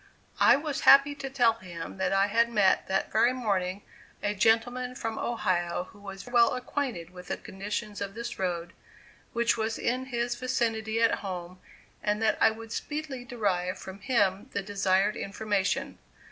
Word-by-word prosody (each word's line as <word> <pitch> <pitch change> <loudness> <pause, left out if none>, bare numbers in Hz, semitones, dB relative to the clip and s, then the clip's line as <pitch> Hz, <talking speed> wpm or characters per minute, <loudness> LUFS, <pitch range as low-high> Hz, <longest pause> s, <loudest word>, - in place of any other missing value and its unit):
I - - +7
was 290 -1 -2
happy 275 +1 +7
to 275 -1 -6
tell 245 -4 +4
him 175 -1 -8
that 190 -1 0
I 195 0 +4
had 230 +3 +2
met 205 -5 +3
that 190 0 0
very 235 +3 +4
morning 200 -6 -1 0.4
a 205 - +1
gentleman 235 +5 +1
from 225 -3 -4
Ohio 180 -6 -1
who 210 - -17
was 195 -1 -9
well 240 -1 +4
acquainted 250 - -3
with 180 0 -11
the - - -2
condition 205 +3 -5
of 200 0 -4
this 235 -3 -5
road, 175 -2 -2 0.6
which 235 -1 +2
was 220 0 -1
in 255 +2 -1
his 240 -2 -1
vicinity 230 -3 -1
at 230 - +3
home, 185 -2 -6 0.4
and 210 0 0
that 220 -1 +1
I - - +7
would 225 0 -8
speedily 295 -3 -4
derive 190 -6 -1
from 190 +1 -9
him 200 -5 +1
the 200 - -1
desired 200 0 +1
information. 200 -1 -1
215 Hz, 165 wpm, -28 LUFS, 190-240 Hz, 0.6 s, I